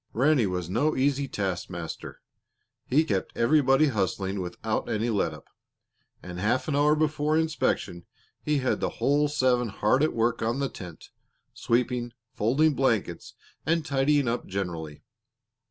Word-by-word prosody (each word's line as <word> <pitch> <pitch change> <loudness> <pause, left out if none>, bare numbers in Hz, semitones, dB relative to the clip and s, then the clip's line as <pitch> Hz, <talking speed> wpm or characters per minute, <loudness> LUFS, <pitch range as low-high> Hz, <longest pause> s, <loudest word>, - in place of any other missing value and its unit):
Ranny 130 -2 +3
was 90 -2 -3
no 145 - +1
easy 140 +1 +1
taskmaster. 90 -6 -5 0.7
He 150 +5 +3
kept 100 -10 -3
everybody 135 +3 +4
hustling 95 -3 -1
without 90 +5 -3
any 115 +2 0
let 100 - +1
up, - - -12 0.8
and 90 0 -7
half 110 +7 0
an 150 - 0
hour 150 +1 +4
before 155 0 +1
inspection 155 - -1 0.3
he 150 -1 0
had 130 -2 0
the - - 0
whole 145 +1 +2
seven 130 -4 +1
hard 105 +6 +1
at 155 - +2
work 115 +1 0
on 115 +3 0
the 140 -1 -1
tent, 90 -5 -11 0.4
sweeping, 120 0 -1 0.2
folding 140 +9 +2
blankets, 115 -10 -1 0.3
and 165 0 0
tidying 140 -1 +2
up 120 +1 -2
generally. 85 -6 -5
125 Hz, 140 wpm, -27 LUFS, 100-145 Hz, 0.8 s, everybody